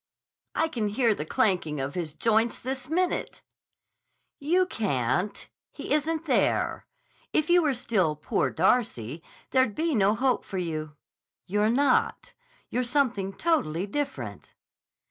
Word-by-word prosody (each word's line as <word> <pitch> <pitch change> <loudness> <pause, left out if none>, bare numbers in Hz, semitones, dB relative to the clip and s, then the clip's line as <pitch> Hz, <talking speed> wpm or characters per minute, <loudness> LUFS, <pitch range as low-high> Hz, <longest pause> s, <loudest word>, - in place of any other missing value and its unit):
"I 325 - +2
can 230 -9 -2
hear 225 +2 +2
the 150 - -5
clanking 165 -8 +1
of 135 +1 -3
his 160 -4 -4
joints 225 +3 +2
this 265 +2 -5
minute!" 360 +2 -1 1.0
"You 350 +6 +2
can't. 180 - -1 0.2
He - - -4
isn't 315 +2 0
there. 270 - +1 0.5
If 310 +2 +2
you 355 0 +6
were 295 -5 +1
still 190 -10 +1
'Poor 150 - 0
Darcy,' 165 - 0 0.3
there'd 260 -5 +3
be 325 0 0
no 205 -2 +3
hope 255 +1 +1
for 195 - -6
you. 155 -4 -3 0.5
You're 210 +3 +1
not. 260 +2 +1 0.4
You're 250 - 0
something 240 -7 0
totally 200 - 0
different." 140 - -5
225 Hz, 130 wpm, -27 LUFS, 175-280 Hz, 1.0 s, you